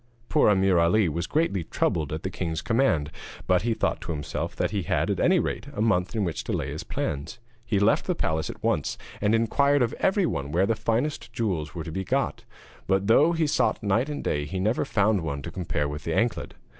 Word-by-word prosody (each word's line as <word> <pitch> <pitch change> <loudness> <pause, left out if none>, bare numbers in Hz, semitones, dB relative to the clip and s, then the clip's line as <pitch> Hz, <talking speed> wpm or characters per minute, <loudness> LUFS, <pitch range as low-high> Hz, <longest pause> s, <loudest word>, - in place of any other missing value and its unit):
Poor 150 -7 +4
Ameer 95 -3 +4
Ali 90 +4 +3
was 85 +2 -2
greatly 150 - 0
troubled 80 -1 -1
at 80 +1 -4
the 95 - -3
king's 85 -3 -3
command, 95 - +1 0.3
but 90 -1 +3
he 115 0 0
thought - - -1
to - - -5
himself 75 -3 -4
that - - -1
he 100 - -1
had, 80 - 0
at - - -2
any - - +4
rate, - - -2
a - - -5
month 100 -3 +1
in 110 - +1
which 85 -5 -3
to - - -4
lay - - -2
his - - -5
plans. 70 - -4 0.3
He 115 -3 0
left 100 +3 +2
the 180 - +1
palace 80 - -1
at - - -9
once, - - 0 0.2
and 105 +2 +3
inquired 140 +5 +3
of 115 - -1
everyone 175 - +1
where 90 +5 +3
the 115 - +2
finest 115 +7 -1
jewels 90 -10 -2
were 85 - -4
to 80 - -6
be 95 +4 -3
got; - - -1 0.4
but 95 0 +2
though 145 +10 +5
he 165 -1 +1
sought 150 -5 +1
night 110 +7 +1
and 145 - -4
day 75 0 -1
he 95 +5 -4
never 110 +6 +1
found 105 -2 +2
one 70 -3 -4
to - - -6
compare 75 -5 -2
with 75 +1 -6
the 80 - -2
anklet. 115 0 -1
95 Hz, 225 wpm, -26 LUFS, 80-115 Hz, 0.4 s, though